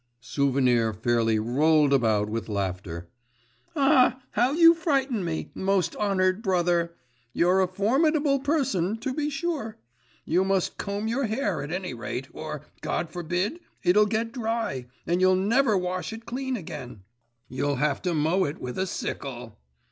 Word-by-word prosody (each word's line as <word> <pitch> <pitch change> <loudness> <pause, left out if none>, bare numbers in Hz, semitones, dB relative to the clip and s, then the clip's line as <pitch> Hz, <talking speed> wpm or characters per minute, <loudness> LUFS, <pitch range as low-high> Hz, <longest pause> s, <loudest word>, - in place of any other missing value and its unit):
Souvenir 125 -2 +1
fairly 115 +1 +1
rolled 145 +6 +3
about 110 -5 +2
with 115 +1 -4
laughter. 95 -4 -3 0.7
'Ah, 270 -3 +4
how 245 +4 +2
you 330 +2 +7
frighten 275 - 0
me, 165 -2 -4
most 190 -3 0
honoured 190 -1 +1
brother. 175 -4 +1 0.4
You're 180 +3 +3
a 185 - +2
formidable 275 - +2
person, 250 - 0
to 255 +3 -3
be 295 +1 -1
sure. 285 -7 -3 0.5
You 180 +3 +2
must 190 -1 0
comb 200 +2 -3
your 250 +4 0
hair, 210 - -1
at 145 +2 -6
any 180 -4 -3
rate, 120 +3 -5
or, - - -6 0.2
God 160 -1 -2
forbid, 180 - -2 0.2
it'll 210 +4 +5
get 225 +2 -1
dry, 225 - -2 0.2
and 175 +2 0
you'll 185 0 +5
never 215 +3 +3
wash 180 +1 -2
it 225 +1 -9
clean 260 +2 -3
again; 135 - -8 0.4
you'll 140 +3 -1
have 145 +1 0
to 180 -3 -1
mow 160 +5 +2
it 145 - -4
with 125 +5 -6
a 190 - 0
sickle. 120 - -5
185 Hz, 150 wpm, -26 LUFS, 140-230 Hz, 0.7 s, you